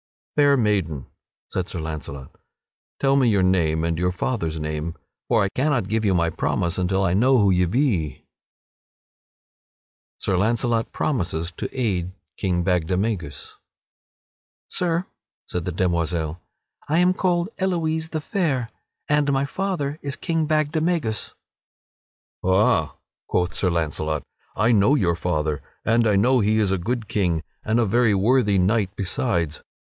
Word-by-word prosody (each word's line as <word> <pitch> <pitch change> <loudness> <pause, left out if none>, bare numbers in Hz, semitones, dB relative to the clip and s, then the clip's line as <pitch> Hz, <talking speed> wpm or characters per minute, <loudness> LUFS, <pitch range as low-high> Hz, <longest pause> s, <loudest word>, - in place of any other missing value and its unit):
"Fair 145 -1 +5
maiden," 95 - 0 0.4
said 90 -1 -3
Sir - - -5
Launcelot, 75 -4 -6 0.7
"tell 135 0 +3
me 130 -4 +4
your 100 -3 +3
name 80 -4 +2
and 85 0 -1
your 90 +1 +1
father's 90 -5 -2
name, 75 +2 -3 0.3
for 115 -4 +3
I 100 - 0
cannot 135 -2 0
give 110 +1 0
you 100 -3 +2
my 85 -1 +2
promise 85 +1 -1
until 95 +1 +1
I 85 -2 +2
know 130 +7 +4
who 100 -4 +4
ye 90 0 +3
be." 105 - +1
[Sidenote: - - -19 1.9
Sir 95 - 0
Launcelot 115 +3 +1
promises 85 - -1
to - - -5
aid 95 -7 -1 0.2
King 90 -3 0
Bagdemagus] 95 - -1 1.2
"Sir," 175 -1 0 0.4
said 90 -1 -3
the 90 - -2
demoiselle, 85 -2 -1 0.5
"I 155 - +2
am 180 +1 +4
called 175 -1 0
Elouise 160 -4 0
the 155 -2 -3
Fair, 150 - -1 0.4
and 145 -1 +2
my 135 0 +1
father 155 -3 -2
is 140 -1 -4
King 165 -2 -1
Bagdemagus." 155 -5 0 1.1
"Ha!" 95 -5 +2 0.3
quoth 90 0 0
Sir 95 - 0
Launcelot, 80 -2 -1 0.3
"I 110 +3 +3
know 105 +5 +4
your 90 - +2
father, 75 -3 -1 0.2
and 115 0 +3
I 105 - +3
know 125 +6 +4
that 100 - +1
he 110 +1 +3
is 105 -3 +2
a 95 - +1
good 115 +4 -2
king 85 -7 0 0.2
and 110 +2 +1
a 120 - +3
very 115 0 +3
worthy 105 0 +3
knight 95 +2 +2
besides. 90 - -1
100 Hz, 145 wpm, -23 LUFS, 85-135 Hz, 1.9 s, Fair